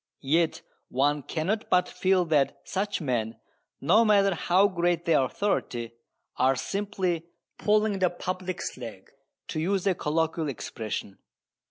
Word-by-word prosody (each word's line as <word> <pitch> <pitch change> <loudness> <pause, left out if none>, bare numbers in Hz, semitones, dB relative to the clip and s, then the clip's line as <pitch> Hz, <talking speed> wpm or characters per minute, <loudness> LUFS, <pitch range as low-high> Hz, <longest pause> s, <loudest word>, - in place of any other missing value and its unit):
Yet 160 +4 +1 0.3
one 145 +3 +1
cannot 180 +10 -2
but 180 0 +3
feel 185 -1 +2
that 145 -3 +2
such 200 0 -2
men, 115 -5 -1 0.4
no 215 +11 +5
matter 200 -3 +4
how 185 +4 +3
great 175 -2 0
their 165 - +4
authority, 125 - -1 0.5
are 130 +1 +3
simply 185 +2 -2 0.3
"pulling 210 -1 +2
the 185 -1 +3
public's 185 +1 -4
leg," 115 -6 -9 0.4
to 155 - -2
use 190 +4 0
a 195 - +4
colloquial 160 0 -1
expression. 110 -4 -5
170 Hz, 130 wpm, -27 LUFS, 140-195 Hz, 0.5 s, no